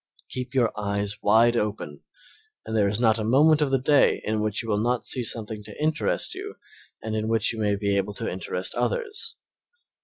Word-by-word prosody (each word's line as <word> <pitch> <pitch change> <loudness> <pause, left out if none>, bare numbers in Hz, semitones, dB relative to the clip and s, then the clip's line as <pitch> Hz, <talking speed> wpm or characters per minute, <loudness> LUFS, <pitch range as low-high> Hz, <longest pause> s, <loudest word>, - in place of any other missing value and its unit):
Keep 125 0 -5
your 120 -3 +3
eyes 100 -1 -3
wide 115 +3 +4
open 105 -10 -3 0.6
and 110 - -4
there 105 -2 +3
is 100 +2 -1
not 110 -2 +3
a - - -1
moment 150 +7 +4
of 145 - +2
the 135 - +3
day 140 +2 +3
in 110 0 0
which 105 0 -1
you - - -8
will 105 -1 +1
not 120 +1 0
see 125 - 0
something 110 -2 -2
to 105 0 -11
interest 155 +1 0
you - - -7 0.5
and 110 0 -3
in 110 0 -1
which 115 0 +1
you 115 - -6
may 105 -1 +1
be 100 0 0
able 100 +1 -2
to - - -4
interest 90 0 -3
others. 455 -1 -2
110 Hz, 205 wpm, -25 LUFS, 105-125 Hz, 0.6 s, wide